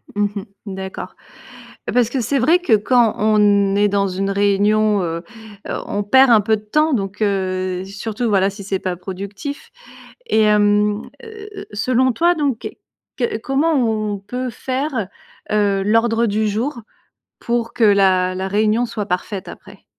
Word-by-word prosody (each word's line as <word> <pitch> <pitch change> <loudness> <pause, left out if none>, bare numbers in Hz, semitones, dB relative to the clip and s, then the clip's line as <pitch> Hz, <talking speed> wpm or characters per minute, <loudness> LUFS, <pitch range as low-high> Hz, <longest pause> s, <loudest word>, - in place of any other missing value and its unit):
Mmh 205 0 +2
mh, 200 - -3 0.2
d'accord. 190 -1 -7 0.8
Parce 245 -2 +3
que 255 +2 -2
c'est 245 +4 0
vrai 315 +8 +3
que, 350 -9 -1
quand 225 +1 +3
on 205 -2 +3
est 205 0 +3
dans 200 0 +1
une 195 +1 -2
réunion, 205 +1 +2
heu 165 -1 -3 0.5
heu, - - -2
on 205 - -2
perd 260 +5 +5
un 225 -2 +7
peu 220 +2 +1
de 210 - -10
temps, 305 +8 +1
donc, 195 -2 -3
heu, 185 -2 -1
surtout, 215 +4 -4
voilà, 195 -2 +3
si 200 0 -10
c'est 195 0 -2
pas 185 -1 -3
productif. 200 +9 -7 0.6
Et 220 - +2
hem, 210 0 +3 0.2
heu - - -11
heu 435 -1 -10
heu, - - -9
selon 255 +4 +1
toi, 345 +7 +2
donc, 285 -7 -2 0.5
que 240 -4 -1
comment 280 +7 0
on 215 -5 0
peut 250 +6 -5
faire, 255 -2 -3 0.4
heu, 200 -2 +2
l'ordre 225 +3 +2
du 215 0 0
jour 235 +6 -2 0.6
pour 235 -1 -2
que 230 - +1
la 190 -3 +3
la 190 +1 -3
réunion 215 +4 +2
soit 225 -3 -4
parfaite 190 +1 -3
après? - - -13
210 Hz, 165 wpm, -19 LUFS, 200-240 Hz, 0.8 s, un